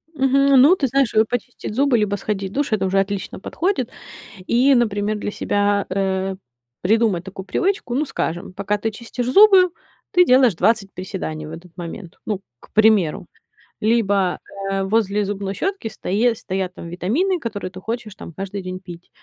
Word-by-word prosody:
Мгм. 270 Hz, -1 st, +4 dB
Ну, 310 Hz, +7 st, +7 dB
ты 280 Hz, -7 st, 0 dB
знаешь, 270 Hz, -1 st, +1 dB
вот 220 Hz, 0 st, +4 dB
почистить 245 Hz, -2 st, -4 dB
зубы 275 Hz, -1 st, +3 dB
либо 210 Hz, -1 st, +1 dB
сходить 195 Hz, -1 st, -3 dB
в -, -, -13 dB
душ- 285 Hz, -3 st, -1 dB
это 195 Hz, -3 st, +1 dB
уже 195 Hz, +1 st, +2 dB
отлично 195 Hz, -1 st, -3 dB
подходит. 330 Hz, -, -1 dB, 0.6 s
И, 265 Hz, +4 st, +4 dB
например, 215 Hz, -3 st, +1 dB
для 205 Hz, -, -4 dB
себя, 205 Hz, -1 st, 0 dB
э, 190 Hz, 0 st, -1 dB, 0.5 s
придумать 210 Hz, -3 st, +2 dB
такую 190 Hz, 0 st, -8 dB
привычку. 385 Hz, -, -1 dB
Ну 300 Hz, -, +1 dB
скажем, 175 Hz, -, -4 dB
пока 200 Hz, +2 st, -1 dB
ты 225 Hz, +2 st, -2 dB
чистишь 235 Hz, +2 st, -5 dB
зубы, 390 Hz, 0 st, +7 dB, 0.4 s
ты 360 Hz, 0 st, +6 dB
делаешь 255 Hz, -, +5 dB
двадцать 205 Hz, +1 st, +1 dB
приседаний 180 Hz, -5 st, -5 dB
в 155 Hz, -, -8 dB
этот 170 Hz, +1 st, -11 dB
момент. 175 Hz, +1 st, -8 dB
Ну, 210 Hz, -3 st, -2 dB, 0.2 s
к -, -, -18 dB
примеру, 210 Hz, -6 st, +3 dB, 0.6 s
либо, 200 Hz, -5 st, +2 dB, 0.3 s
э, 195 Hz, 0 st, 0 dB
возле 205 Hz, 0 st, +1 dB
зубной 195 Hz, 0 st, -3 dB
щётки 385 Hz, -, -2 dB
стои 225 Hz, +3 st, 0 dB
стоят 190 Hz, -2 st, -4 dB
там 170 Hz, -, -8 dB
витамины, 255 Hz, -, 0 dB
которые 210 Hz, -, -5 dB
ты 185 Hz, -, -9 dB
хочешь 225 Hz, 0 st, -5 dB
там 190 Hz, -, -10 dB
каждый 195 Hz, +3 st, -5 dB
день 185 Hz, 0 st, -6 dB
пить, 175 Hz, -2 st, -12 dB
205 Hz, 170 wpm, -21 LUFS, 190-245 Hz, 0.6 s, Ну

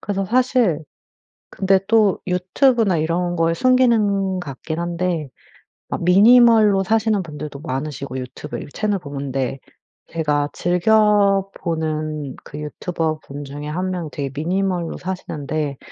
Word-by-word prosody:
그래서 195 Hz, -1 st, -2 dB
사실 240 Hz, -, +2 dB, 0.7 s
근데 190 Hz, 0 st, +2 dB
또 215 Hz, -4 st, +4 dB
유튜브나 190 Hz, -, +2 dB
이런 175 Hz, +3 st, 0 dB
거의 165 Hz, -1 st, +1 dB
순기능 210 Hz, -5 st, +2 dB
같긴 160 Hz, 0 st, -6 dB
한데 170 Hz, -4 st, -2 dB, 0.6 s
막 -, -, -3 dB
minimal로 215 Hz, +1 st, +6 dB
사시는 220 Hz, 0 st, +1 dB
분들도 150 Hz, -4 st, -7 dB
많으시고 135 Hz, -2 st, -4 dB
유튜브 125 Hz, 0 st, -7 dB
이렇게 145 Hz, -, -9 dB
채널 210 Hz, -1 st, 0 dB
보는데. 135 Hz, -3 st, -4 dB, 0.5 s
제가 150 Hz, -3 st, 0 dB
즐겨보는 175 Hz, -7 st, +1 dB
그 145 Hz, -, -9 dB
유튜버분 155 Hz, -2 st, -4 dB
중에 145 Hz, +2 st, -7 dB
1 180 Hz, +4 st, -2 dB
명이 175 Hz, -4 st, -4 dB
되게 140 Hz, -2 st, -4 dB
minimal로 180 Hz, +2 st, -1 dB
사시는데 155 Hz, -6 st, -4 dB
175 Hz, 310 characters per minute, -20 LUFS, 150-195 Hz, 0.7 s, minimal로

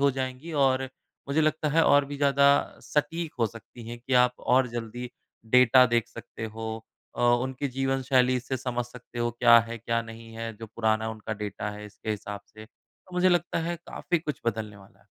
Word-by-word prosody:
हो 140 Hz, 0 st, +4 dB
जाएँगी 130 Hz, +5 st, -5 dB
और 130 Hz, 0 st, +2 dB, 0.5 s
मुझे 150 Hz, +3 st, +2 dB
लगता 155 Hz, 0 st, +1 dB
है 165 Hz, +2 st, +3 dB
और 145 Hz, 0 st, +5 dB
भी 140 Hz, +1 st, -6 dB
ज़्यादा 140 Hz, 0 st, +4 dB, 0.3 s
सटीक 155 Hz, +2 st, -1 dB
हो 115 Hz, -, +4 dB
सकती 115 Hz, +1 st, -11 dB
हैं 120 Hz, 0 st, -6 dB
कि 125 Hz, +2 st, -2 dB
आप 125 Hz, 0 st, -1 dB, 0.2 s
और 130 Hz, -1 st, +4 dB
जल्दी 120 Hz, +1 st, -5 dB, 0.4 s
डेटा 125 Hz, 0 st, +7 dB
देख 120 Hz, -2 st, +1 dB
सकते 115 Hz, -, -9 dB
हो। 110 Hz, 0 st, -5 dB, 0.4 s
अ, -, -, -4 dB
उनकी 125 Hz, +3 st, +1 dB
जीवन 135 Hz, +1 st, -1 dB
शैली 130 Hz, -1 st, +3 dB
से 130 Hz, +2 st, -3 dB
समझ 125 Hz, -1 st, -2 dB
सकते 120 Hz, 0 st, -11 dB
हो 120 Hz, 0 st, +1 dB
क्या 120 Hz, -1 st, +8 dB
है 115 Hz, 0 st, -5 dB
क्या 115 Hz, +1 st, -1 dB
नहीं 115 Hz, 0 st, -11 dB
है 115 Hz, 0 st, -5 dB
जो 115 Hz, +1 st, -8 dB
पुराना 110 Hz, 0 st, 0 dB
उनका 110 Hz, 0 st, -6 dB
डेटा 105 Hz, 0 st, -4 dB
है 105 Hz, 0 st, -8 dB
इसके 105 Hz, +1 st, -7 dB
हिसाब 105 Hz, -1 st, -4 dB
से। 110 Hz, -, -10 dB
तो 185 Hz, +9 st, -20 dB
मुझे 180 Hz, +1 st, +4 dB
लगता 175 Hz, -1 st, +1 dB
है 175 Hz, -, -2 dB
काफ़ी 175 Hz, -2 st, -1 dB
कुछ 150 Hz, -2 st, -5 dB
बदलने 110 Hz, -2 st, -2 dB
वाला 95 Hz, -1 st, -18 dB
है। -, -, -28 dB
125 Hz, 200 wpm, -27 LUFS, 115-140 Hz, 0.5 s, क्या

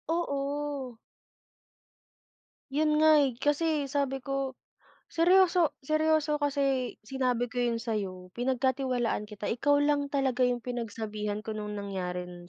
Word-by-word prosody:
Oo. 280 Hz, -5 st, -3 dB, 1.7 s
Yun 300 Hz, +1 st, +2 dB
nga, 315 Hz, 0 st, +7 dB
eh. 270 Hz, -, +1 dB
Kasi 295 Hz, 0 st, +1 dB
sabi 275 Hz, -1 st, -1 dB
ko, 275 Hz, 0 st, -2 dB, 0.6 s
seryoso 350 Hz, -1 st, +4 dB
seryoso 310 Hz, -1 st, +2 dB
kasi 275 Hz, -3 st, 0 dB
sinabi 250 Hz, -1 st, 0 dB
ko 245 Hz, +1 st, -5 dB
yun 240 Hz, -1 st, +1 dB
sa'yo, 195 Hz, -6 st, -4 dB
pinagkatiwalaan 255 Hz, -3 st, 0 dB
kita, 210 Hz, -1 st, -7 dB
ikaw 285 Hz, +5 st, +2 dB
lang 290 Hz, -1 st, +1 dB
talaga 270 Hz, -3 st, 0 dB
yung 245 Hz, -1 st, +2 dB
pinagsabihan 215 Hz, -3 st, -4 dB
ko 220 Hz, -, -3 dB
nung 210 Hz, -1 st, -5 dB
nangyaring 180 Hz, -3 st, -5 dB
260 Hz, 115 wpm, -29 LUFS, 225-290 Hz, 1.7 s, nga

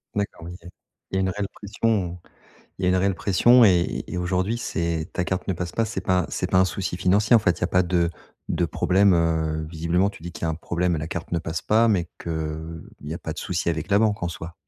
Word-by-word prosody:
D'accord, 100 Hz, -5 st, -3 dB
OK. 90 Hz, 0 st, -10 dB, 0.4 s
Il -, -, -3 dB
y -, -, +2 dB
a -, -, +2 dB
une 95 Hz, -, +1 dB
réelle 100 Hz, +1 st, -2 dB
pression, 100 Hz, -3 st, -1 dB
heu, -, -, -24 dB, 0.5 s
il 95 Hz, -, -6 dB
y -, -, +3 dB
a 90 Hz, -, +4 dB
une 90 Hz, -, +3 dB
réelle 95 Hz, 0 st, +2 dB
pression 120 Hz, +7 st, +5 dB
et 90 Hz, -3 st, +2 dB
et 90 Hz, -, -4 dB
aujourd'hui, 95 Hz, +5 st, 0 dB
c'est 85 Hz, -5 st, -2 dB
ta 90 Hz, -, 0 dB
carte 95 Hz, 0 st, -3 dB
ne 95 Hz, -, +1 dB
passe 85 Hz, +1 st, -4 dB
pas. 115 Hz, -, 0 dB
C'est 105 Hz, -4 st, -4 dB
pas 90 Hz, -2 st, +1 dB
c'est -, -, -2 dB
pas 95 Hz, -, +5 dB
un 95 Hz, -, +5 dB
souci 90 Hz, -1 st, -3 dB
financier, 100 Hz, +5 st, +4 dB
en -, -, +7 dB
fait? 90 Hz, -5 st, +1 dB
Il -, -, -19 dB
y -, -, +2 dB
a 85 Hz, -, +2 dB
pas 90 Hz, 0 st, +3 dB
de 85 Hz, -1 st, +1 dB, 0.4 s
de 85 Hz, -, 0 dB
problème, 95 Hz, +4 st, +3 dB
heu 80 Hz, -1 st, 0 dB
visiblement, 85 Hz, +4 st, +1 dB
tu -, -, -14 dB
dis 85 Hz, +1 st, -7 dB
qu'il -, -, -9 dB
y -, -, +2 dB
a -, -, +1 dB
un 80 Hz, -, -2 dB
problème 85 Hz, +1 st, -1 dB
et -, -, -3 dB
la 75 Hz, -, -4 dB
carte 85 Hz, 0 st, -6 dB
ne 85 Hz, -, +1 dB
passe 80 Hz, 0 st, -4 dB
pas, 115 Hz, +2 st, +4 dB
mais 90 Hz, -6 st, +1 dB
que, 85 Hz, -, -7 dB
heu, 80 Hz, 0 st, -5 dB
il 75 Hz, -, -9 dB
n'y 75 Hz, -, -3 dB
a 85 Hz, -, -4 dB
pas 80 Hz, -, -5 dB
de -, -, -7 dB
souci 90 Hz, -1 st, -1 dB
avec 80 Hz, +1 st, -3 dB
la 100 Hz, -, +4 dB
banque 105 Hz, -2 st, +1 dB
en 85 Hz, -, 0 dB
soi. 85 Hz, 0 st, -7 dB
90 Hz, 280 wpm, -24 LUFS, 85-95 Hz, 0.5 s, en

